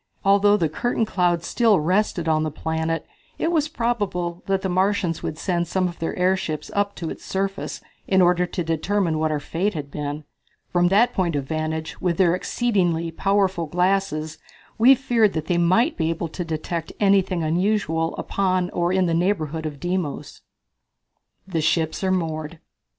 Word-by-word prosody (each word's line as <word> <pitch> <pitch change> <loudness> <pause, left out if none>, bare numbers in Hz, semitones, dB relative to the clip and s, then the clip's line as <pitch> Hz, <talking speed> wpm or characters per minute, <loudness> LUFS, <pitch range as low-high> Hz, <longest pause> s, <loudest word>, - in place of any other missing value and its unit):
Although 200 +1 +5
the 165 - +1
cloud 225 +9 -1
curtain 175 -4 +1
still 225 0 +3
rested 180 +1 0
on 155 -1 +2
the 155 - -1
planet 160 +2 -2 0.3
it 330 - 0
was 310 -3 +2
probable 205 - -2
that 195 -1 0
the - - 0
Martians 185 -2 0
would 155 - -4
send 175 -1 -1
some 185 +1 0
of 175 - -8
their 165 - -2
airships 180 -4 0
up 200 0 0
to 165 -2 -5
its - - -9
surface 195 0 -3 0.3
in 190 - +3
order 180 0 +4
to 175 - -3
determine 165 +1 0
what 155 0 +1
our 150 -1 -1
fate 180 +7 -2
had 145 -2 -5
been. 150 +1 -4 0.5
From 175 0 +4
that 210 +6 +4
point 175 -4 0
of 140 - -1
vantage, 155 +2 -4
with 175 -2 0
their 175 -3 +4
exceedingly 180 -5 0
powerful 195 -3 +1
glasses, 180 -2 0 0.4
we 255 +4 +8
feared 235 -5 +2
that 155 -1 -3
they 175 0 +1
might 185 - +3
be 160 -1 0
able 165 0 -3
to 175 - -4
detect 165 0 -4
anything 195 -4 +2
unusual 165 -1 0
upon 185 -2 0
or 175 0 0
in 185 0 +2
the 170 - 0
neighborhood 165 -3 0
of 145 -2 -8
Deimos. 175 -3 -3 1.1
The 165 -4 -1
Ships 160 +2 0
are 190 - +1
Moored. 160 -3 -2
175 Hz, 170 wpm, -23 LUFS, 160-195 Hz, 1.1 s, we